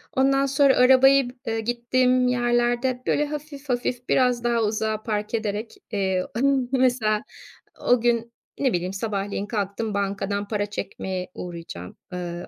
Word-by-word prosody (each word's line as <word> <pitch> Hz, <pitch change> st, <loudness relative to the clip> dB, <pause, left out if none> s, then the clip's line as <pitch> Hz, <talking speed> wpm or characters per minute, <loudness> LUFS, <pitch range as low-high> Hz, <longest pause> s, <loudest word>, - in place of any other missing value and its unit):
Ondan 275 Hz, +1 st, +3 dB
sonra 275 Hz, 0 st, +4 dB
arabayı 265 Hz, +1 st, +6 dB
bı -, -, -12 dB
ııı, 225 Hz, 0 st, -1 dB
gittiğim 250 Hz, +2 st, +2 dB
yerlerde, 240 Hz, +1 st, +1 dB
böyle 295 Hz, -, +2 dB
,hafif 295 Hz, -1 st, -7 dB
hafif 245 Hz, 0 st, -2 dB
biraz 250 Hz, -2 st, +2 dB
daha 235 Hz, -1 st, +2 dB
uzağa 215 Hz, 0 st, -1 dB
park 210 Hz, -1 st, -3 dB
ederek, 220 Hz, 0 st, -2 dB, 0.2 s
eee, 190 Hz, -3 st, 0 dB
emm, 275 Hz, 0 st, +3 dB
ıh, -, -, -7 dB
mesela 245 Hz, -5 st, +2 dB, 0.6 s
o 245 Hz, -1 st, +3 dB
gün, 235 Hz, -1 st, +1 dB, 0.3 s
ne 270 Hz, -3 st, +2 dB
bileyim, 180 Hz, +2 st, -1 dB
sabahleyin 200 Hz, -1 st, -3 dB
kalktım 205 Hz, 0 st, -3 dB
bankadan 200 Hz, 0 st, -2 dB
para 205 Hz, -1 st, -1 dB
çekmeye 190 Hz, -2 st, -5 dB
uğrayacağım. 165 Hz, -, -8 dB, 0.2 s
Eee, 175 Hz, -1 st, -5 dB
235 Hz, 145 wpm, -24 LUFS, 205-255 Hz, 0.6 s, arabayı